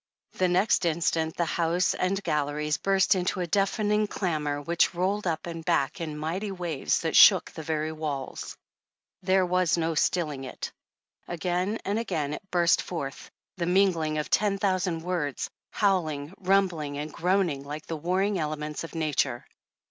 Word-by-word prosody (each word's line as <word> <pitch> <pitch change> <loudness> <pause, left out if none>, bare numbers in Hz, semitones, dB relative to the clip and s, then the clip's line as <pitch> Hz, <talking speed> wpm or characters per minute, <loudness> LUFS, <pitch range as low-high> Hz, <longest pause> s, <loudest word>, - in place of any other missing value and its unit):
The 185 - +1
next 185 +4 +2
instant 160 -1 0
the 170 - +1
House 170 +2 +1
and 195 +2 -1
galleries 150 +1 0
burst 195 -1 +3
into 185 0 -1
a 180 - 0
deafening 210 +3 +1
clamor 150 -8 -2
which 170 +4 +1
rolled 190 +3 0
up 160 -2 -1
and 165 -1 -6
back 165 -3 0
in 155 -2 -4
mighty 170 +7 -3
waves 175 -6 -1
that - - -1
shook - - +7
the - - -7
very 155 0 -2
walls. 150 -4 -5 0.6
There 185 0 +3
was 180 -1 +2
no 165 0 0
still 160 +1 +1
ing 135 -2 -7
it. 130 - -6 0.6
Again 180 +4 -1
and 205 +3 0
again 160 -10 -2
it - - -5
burst 175 -1 +3
forth, 140 -6 -6 0.3
the 170 - -1
mingl 180 -2 +3
ing 155 0 -1
of 150 - -3
ten 205 -1 +2
thousand 185 -4 0
words, 165 -7 -2 0.2
howling, 160 -7 0
rumbling 180 -7 +1
and 150 +1 -5
groaning 180 -5 +1
like 145 +2 -7
the 165 - -4
warring 185 +5 0
elements 150 0 -3
of 165 - -9
nature. 145 -6 0
170 Hz, 165 wpm, -27 LUFS, 155-185 Hz, 0.6 s, shook